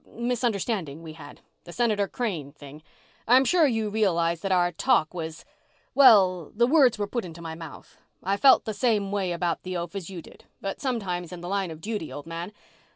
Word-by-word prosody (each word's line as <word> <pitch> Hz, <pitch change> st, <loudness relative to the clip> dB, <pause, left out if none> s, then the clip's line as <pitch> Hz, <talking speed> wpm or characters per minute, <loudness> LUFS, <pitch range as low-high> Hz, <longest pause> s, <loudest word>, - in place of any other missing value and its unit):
misunderstanding 220 Hz, -, -2 dB
we 160 Hz, -1 st, -8 dB
had, 145 Hz, -2 st, -13 dB, 0.2 s
the 175 Hz, -, -11 dB
Senator 210 Hz, -1 st, +1 dB
Crane 180 Hz, -, -4 dB
thing, 145 Hz, 0 st, -13 dB, 0.5 s
I'm 255 Hz, +3 st, +6 dB
sure 335 Hz, +1 st, +4 dB
you 225 Hz, -4 st, -1 dB
realized 170 Hz, -6 st, +1 dB
that 195 Hz, -, -2 dB
our 175 Hz, -1 st, +3 dB
talk 185 Hz, -4 st, +1 dB
was... 160 Hz, -2 st, -6 dB, 0.5 s
well, 190 Hz, -, +6 dB
the 235 Hz, +3 st, +4 dB
words 260 Hz, -3 st, +4 dB
were 205 Hz, -, -1 dB
put 235 Hz, +4 st, -3 dB
into 170 Hz, -2 st, -9 dB
my 165 Hz, -1 st, -6 dB
mouth. 160 Hz, -2 st, -11 dB, 0.2 s
I 195 Hz, +2 st, +1 dB
felt 265 Hz, +6 st, +5 dB
the 220 Hz, -, -3 dB
same 205 Hz, -2 st, 0 dB
way 195 Hz, -3 st, -1 dB
about 170 Hz, 0 st, -1 dB
the 185 Hz, -1 st, -4 dB
oaf 170 Hz, +3 st, -5 dB
as 195 Hz, -3 st, -5 dB
you 180 Hz, -4 st, -8 dB
did. -, -, -17 dB
But 195 Hz, 0 st, -5 dB
sometimes, 195 Hz, -, -3 dB
in 180 Hz, -1 st, -8 dB
the 175 Hz, -, -7 dB
line 195 Hz, -1 st, -1 dB
of 160 Hz, -1 st, -9 dB
duty, 210 Hz, -4 st, -4 dB
old 145 Hz, -, -8 dB
man 165 Hz, +3 st, -6 dB
190 Hz, 200 wpm, -26 LUFS, 170-225 Hz, 0.5 s, I'm